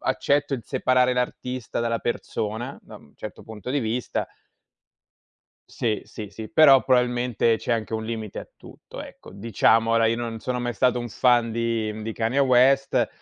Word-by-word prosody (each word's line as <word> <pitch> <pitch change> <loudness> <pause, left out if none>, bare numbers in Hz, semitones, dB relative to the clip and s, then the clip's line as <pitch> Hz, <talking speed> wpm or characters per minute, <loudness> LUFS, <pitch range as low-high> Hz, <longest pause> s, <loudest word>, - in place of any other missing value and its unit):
accetto 140 +1 0
di 120 - -9
separare 125 0 +2
l'artista 125 0 -3
dalla 115 0 -1
persona, 120 +2 -3
da - - -12
un - - -19
certo - - -9
punto 110 +3 -8
di 145 - +1
vista 115 -2 -2 1.4
Sì, 110 -3 -2
sì, 105 -3 -8
sì, 110 +2 -8
però 140 -4 +6
probabilmente 125 -3 +2
c'è 120 - -2
anche 115 -1 -2
un 110 0 -2
limite 110 -2 -5
a - - -8
tutto, - - -11
ecco, - - -13
diciamo 115 +2 +2
ora 115 0 +3
io, 115 - +2
non 115 -1 -4
sono 125 +1 -3
mai 120 0 -2
stato 125 +2 +1
un 120 - -5
fan 120 0 +2
di 115 -1 -1
di 115 - -3
Kanye 115 +5 -1
West, 135 +1 +3
120 Hz, 170 wpm, -24 LUFS, 110-125 Hz, 1.4 s, però